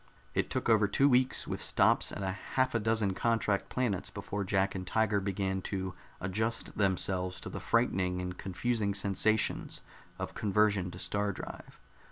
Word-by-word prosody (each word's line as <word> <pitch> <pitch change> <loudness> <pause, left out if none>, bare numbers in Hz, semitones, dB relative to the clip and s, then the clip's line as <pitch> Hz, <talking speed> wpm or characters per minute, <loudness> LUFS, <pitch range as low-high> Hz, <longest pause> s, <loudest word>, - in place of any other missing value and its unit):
It - - 0
took - - -2
over 110 -2 +5
two 135 +7 +3
weeks, 130 -1 +2
with - - -2
stops - - +3
at 100 - -5
half 125 +7 -1
a 115 - +2
dozen 110 -2 +1
contract 110 -1 0
planets, 120 -7 -1
before 100 0 -4
Jack 95 0 +1
and 95 -1 -5
Tiger 105 0 +2
began 95 -1 -2
to 95 -2 -3 0.3
adjust 110 +5 -2
themselves 95 -2 +1
to - - -6
the - - -5
frightening 95 -6 +1
and 90 0 -4
confusing 100 +2 -1
sensations 100 +2 +1 0.4
of - - -5
conversion 105 -3 +2
to 90 - -9
star 100 +2 -1
drive. 90 - -9
100 Hz, 160 wpm, -31 LUFS, 95-110 Hz, 0.4 s, over